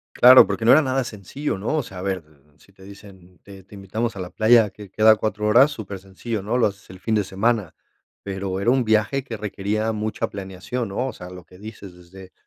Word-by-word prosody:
Claro, 125 Hz, +1 st, +8 dB
porque 115 Hz, -, -3 dB
no 120 Hz, -, +7 dB
era 155 Hz, -, +7 dB
nada 130 Hz, -1 st, 0 dB
sencillo, 115 Hz, +4 st, -5 dB
¿no? 105 Hz, +10 st, -2 dB
O 145 Hz, -, 0 dB
sea, 95 Hz, -4 st, -10 dB
a -, -, -6 dB
ver, 95 Hz, -3 st, -3 dB
d 75 Hz, -, -27 dB
d -, -, -31 dB, 0.2 s
si 100 Hz, -, -23 dB
te 95 Hz, -, -18 dB
dicen, 95 Hz, -2 st, -15 dB
mm: -, -, -27 dB
"Te 95 Hz, -1 st, -13 dB
te 100 Hz, +2 st, -15 dB
invitamos 105 Hz, +4 st, -4 dB
a -, -, -8 dB
la 90 Hz, -1 st, -6 dB
playa 110 Hz, -1 st, +4 dB
que 105 Hz, -3 st, -12 dB
queda 110 Hz, +3 st, +5 dB
a -, -, +6 dB
4 105 Hz, 0 st, -3 dB
horas", 125 Hz, +7 st, +6 dB
súper 100 Hz, -3 st, -7 dB
sencillo, 100 Hz, +3 st, -6 dB
¿no?, 110 Hz, +5 st, -1 dB
lo 115 Hz, -, +3 dB
haces 100 Hz, -1 st, -10 dB
el 95 Hz, 0 st, -12 dB
fin 110 Hz, -, -2 dB
de 105 Hz, -, +1 dB
semana, 100 Hz, -1 st, -1 dB, 0.5 s
pero 95 Hz, -1 st, -4 dB
era 115 Hz, +5 st, +2 dB
un 130 Hz, -1 st, +2 dB
viaje 110 Hz, +5 st, +1 dB
que 115 Hz, -5 st, -7 dB
requería 105 Hz, +2 st, -2 dB
mucha 110 Hz, 0 st, -3 dB
planeación, 100 Hz, +4 st, -5 dB
¿no? 125 Hz, +7 st, -2 dB
O -, -, -5 dB
sea, 90 Hz, 0 st, -10 dB
lo 90 Hz, -1 st, -11 dB
que 90 Hz, -, -18 dB
dices, 105 Hz, -3 st, -10 dB
desde, 90 Hz, +1 st, -14 dB
105 Hz, 250 wpm, -22 LUFS, 95-115 Hz, 0.5 s, Claro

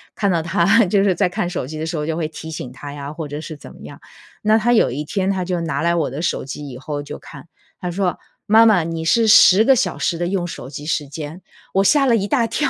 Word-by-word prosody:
看 205 Hz, -4 st, 0 dB
到 170 Hz, -2 st, +1 dB
他 175 Hz, +7 st, +3 dB
就 195 Hz, +2 st, +2 dB
是 195 Hz, -, +3 dB
在 170 Hz, -, +2 dB
看 175 Hz, 0 st, -2 dB
手 175 Hz, -7 st, -3 dB
机 155 Hz, +2 st, -7 dB
的 160 Hz, -, -3 dB
时 165 Hz, +1 st, -4 dB
候 150 Hz, -, -2 dB
就 160 Hz, 0 st, -2 dB
会 165 Hz, -2 st, -1 dB
提 160 Hz, 0 st, -9 dB
醒 150 Hz, -5 st, -6 dB
他 145 Hz, +2 st, -9 dB
呀， 145 Hz, 0 st, -7 dB
或 160 Hz, -1 st, -6 dB
者 145 Hz, +1 st, -5 dB
是 160 Hz, -, -7 dB
怎 -, -, -13 dB
么 -, -, -17 dB
样。 -, -, -11 dB, 0.4 s
那 215 Hz, +1 st, +3 dB
他 230 Hz, +2 st, +1 dB
有 225 Hz, -, +3 dB
一 140 Hz, +5 st, -3 dB
天 190 Hz, +4 st, -1 dB
他 190 Hz, -2 st, -1 dB
就 180 Hz, -1 st, -2 dB
拿 145 Hz, -4 st, -2 dB
来 170 Hz, +1 st, +2 dB
我 165 Hz, -4 st, 0 dB
的 140 Hz, +5 st, -5 dB
手 -, -, -1 dB
机 145 Hz, +2 st, -7 dB
以 125 Hz, -, -8 dB
后 145 Hz, +2 st, -5 dB
就 145 Hz, -, -8 dB
看， -, -, -13 dB, 0.3 s
他 180 Hz, -, -4 dB
说： 180 Hz, 0 st, -1 dB, 0.3 s
“妈 220 Hz, +2 st, +6 dB
妈， 210 Hz, -7 st, +4 dB
你 165 Hz, 0 st, -4 dB
是 230 Hz, +7 st, +3 dB
10 205 Hz, -1 st, +7 dB
个 270 Hz, -, +6 dB
小 250 Hz, -, -1 dB
时 170 Hz, -, -1 dB
的 175 Hz, +1 st, -2 dB
用 185 Hz, -1 st, -1 dB
手 130 Hz, -6 st, -8 dB
机 145 Hz, +1 st, -8 dB
时 150 Hz, -2 st, -1 dB
间”， 150 Hz, +4 st, -8 dB, 0.3 s
我 195 Hz, -, +4 dB
吓 280 Hz, +7 st, +4 dB
了 240 Hz, -3 st, +4 dB
一 200 Hz, -1 st, -2 dB
大 240 Hz, 0 st, +2 dB
跳， 295 Hz, +5 st, -1 dB
170 Hz, 295 characters per minute, -20 LUFS, 150-200 Hz, 0.4 s, 10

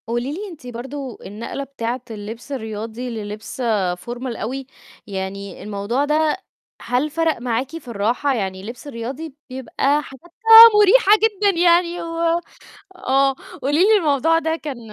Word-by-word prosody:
قولي 240 Hz, +4 st, -2 dB
لي 405 Hz, +6 st, -6 dB
أنتِ 290 Hz, -7 st, -12 dB
برضه 255 Hz, +2 st, -7 dB
النقلة 220 Hz, +7 st, -6 dB
بتاعة 250 Hz, -2 st, -4 dB
اللبس 225 Hz, +5 st, -8 dB
الرياضي 225 Hz, 0 st, -5 dB
للبس 215 Hz, +2 st, -6 dB, 0.4 s
formal 240 Hz, 0 st, -5 dB
أوي، 260 Hz, +5 st, -4 dB, 0.4 s
يعني 195 Hz, -1 st, -6 dB
الموضوع 210 Hz, +7 st, -1 dB
ده 305 Hz, +2 st, +1 dB, 0.4 s
هل 250 Hz, +5 st, 0 dB
فرَق 325 Hz, +1 st, 0 dB
معاكِ 250 Hz, +2 st, -2 dB
في 325 Hz, -, -14 dB
الراحة؟ 235 Hz, +6 st, 0 dB
يعني 190 Hz, -4 st, -3 dB
اللبس 235 Hz, +7 st, -9 dB
الرياضي 270 Hz, +4 st, -6 dB
بيبقى 270 Hz, +3 st, 0 dB
حاجاتها 445 Hz, -, +7 dB
مريحة 415 Hz, +1 st, +5 dB
جدًا 405 Hz, -4 st, +2 dB
يعني 345 Hz, 0 st, +3 dB
و -, -, -5 dB, 0.9 s
آه 270 Hz, -4 st, +2 dB, 0.3 s
قولي 290 Hz, +3 st, +1 dB
لي 435 Hz, +1 st, +5 dB
الموضوع 320 Hz, 0 st, +2 dB
ده 320 Hz, 0 st, -1 dB
كان 290 Hz, -6 st, -6 dB
265 Hz, 135 wpm, -21 LUFS, 230-315 Hz, 0.9 s, حاجاتها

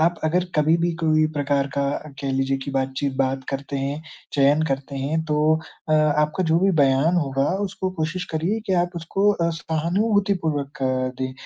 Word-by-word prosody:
आप 170 Hz, +2 st, +3 dB
अगर 175 Hz, +3 st, +2 dB
कभी 155 Hz, +2 st, +4 dB
भी 170 Hz, +1 st, +1 dB
कोई 155 Hz, -1 st, +3 dB
प्रकार 140 Hz, -1 st, +1 dB
का 140 Hz, -, +1 dB, 0.4 s
कह 135 Hz, -1 st, -2 dB
लीजिए 135 Hz, 0 st, +1 dB
कि 140 Hz, -, -4 dB
बातचीत 135 Hz, +1 st, -1 dB
बात 135 Hz, -1 st, 0 dB
करते 140 Hz, +1 st, -4 dB
हैं, 140 Hz, +3 st, -3 dB, 0.3 s
चयन 145 Hz, +2 st, +4 dB
करते 135 Hz, +1 st, -3 dB
हैं 150 Hz, +4 st, -1 dB
तो 150 Hz, +1 st, +3 dB, 0.4 s
अ, -, -, +4 dB
आपका 155 Hz, +3 st, +2 dB
जो 165 Hz, +1 st, +3 dB
भी 195 Hz, +1 st, +4 dB
बयान 140 Hz, +6 st, +3 dB
होगा 135 Hz, -3 st, +1 dB, 0.2 s
उसको 190 Hz, 0 st, -4 dB
कोशिश 180 Hz, +3 st, -2 dB
करिए 180 Hz, +8 st, 0 dB
कि 190 Hz, -, 0 dB
आप 175 Hz, -, -3 dB
उसको 195 Hz, +5 st, +1 dB
अ, 170 Hz, -3 st, 0 dB
सहानुभूतिपूर्वक 165 Hz, -3 st, -1 dB, 0.4 s
दें। 130 Hz, 0 st, -2 dB
155 Hz, 175 wpm, -23 LUFS, 140-170 Hz, 0.4 s, कभी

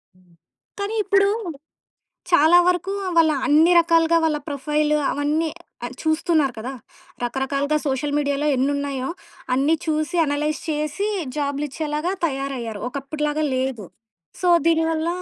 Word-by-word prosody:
హ్మ్. 180 Hz, -1 st, -26 dB, 0.5 s
కానీ, 405 Hz, +2 st, -2 dB
ఇప్పుడు 395 Hz, 0 st, +3 dB, 1.0 s
చాలా 340 Hz, +2 st, +6 dB
వరకు 360 Hz, +2 st, 0 dB, 0.2 s
వాళ్ళ 320 Hz, -1 st, +5 dB, 0.2 s
అన్ని 315 Hz, +4 st, +5 dB
రకాలుగా 335 Hz, 0 st, +3 dB
వాళ్ళ 305 Hz, -2 st, +1 dB
ప్రొఫైలు, 300 Hz, +2 st, 0 dB, 0.2 s
అవన్నీ 300 Hz, +3 st, 0 dB, 0.5 s
చూస్తున్నారు 315 Hz, -4 st, +1 dB
కదా! 245 Hz, +4 st, -5 dB, 0.5 s
రకరకాలుగా 275 Hz, +4 st, -1 dB
సోషల్ 280 Hz, +1 st, -1 dB
మీడియాలో 285 Hz, 0 st, 0 dB
ఎన్ని 270 Hz, +3 st, +1 dB
ఉన్నాయో 275 Hz, -2 st, -3 dB, 0.5 s
అన్ని 285 Hz, +5 st, +2 dB
చూసి, 310 Hz, +2 st, -1 dB
అనలైజ్ 300 Hz, +1 st, -1 dB
చేసి 305 Hz, +7 st, -2 dB, 0.3 s
జాబ్లు 285 Hz, 0 st, -1 dB
ఇచ్చేలాగా 305 Hz, +4 st, -2 dB
తయారయ్యారు. 265 Hz, -7 st, -4 dB
ఒకప్పుడు 280 Hz, +3 st, -6 dB
లాగా 305 Hz, +1 st, -1 dB
లేదు. 255 Hz, -6 st, -2 dB, 0.5 s
సో, 360 Hz, -, +1 dB, 0.2 s
దీనివల్ల 325 Hz, 0 st, +2 dB
300 Hz, 120 wpm, -22 LUFS, 275-325 Hz, 1.0 s, చాలా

